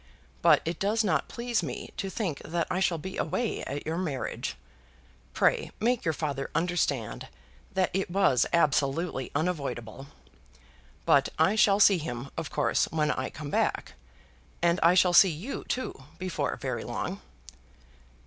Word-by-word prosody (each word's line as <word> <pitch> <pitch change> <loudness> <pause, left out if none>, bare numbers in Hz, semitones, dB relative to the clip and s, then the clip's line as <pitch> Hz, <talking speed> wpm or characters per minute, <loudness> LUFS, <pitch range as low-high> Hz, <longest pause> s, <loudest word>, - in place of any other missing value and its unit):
But - - +5
it 165 0 -3
does 215 +3 +1
not 160 -9 +1
please 235 -2 -1
me 140 -7 -6
to 195 - -3
think 185 -8 -3
that 170 +1 -1
I 185 - 0
shall 175 -3 +1
be 190 +5 -7
away 240 -2 -1
at 140 +2 -5
your 160 +2 -2
marriage. 150 -8 -3 0.8
Pray - - +2
make 235 -1 +1
your 160 - +2
father 140 -3 -3
understand 160 -9 -1 0.5
that 185 -1 +2
it 190 0 -1
was 175 -9 +3
absolutely 145 -2 +1
unavoidable. 140 -6 -3 1.0
But - - +4
I 160 +6 +4
shall 205 -2 +4
see 200 -3 +6
him, 135 -3 -5
of 165 -2 -4
course, - - +1
when 150 -1 0
I 130 - -2
come 145 -1 -7
back. - - 0 0.7
And 170 +1 +2
I 170 +2 +5
shall 180 -1 +4
see 190 +2 +8
you 180 - -5
too 255 - -2 0.2
before 185 0 -2
very - - -4
long." - - -4
170 Hz, 150 wpm, -28 LUFS, 145-190 Hz, 1.0 s, see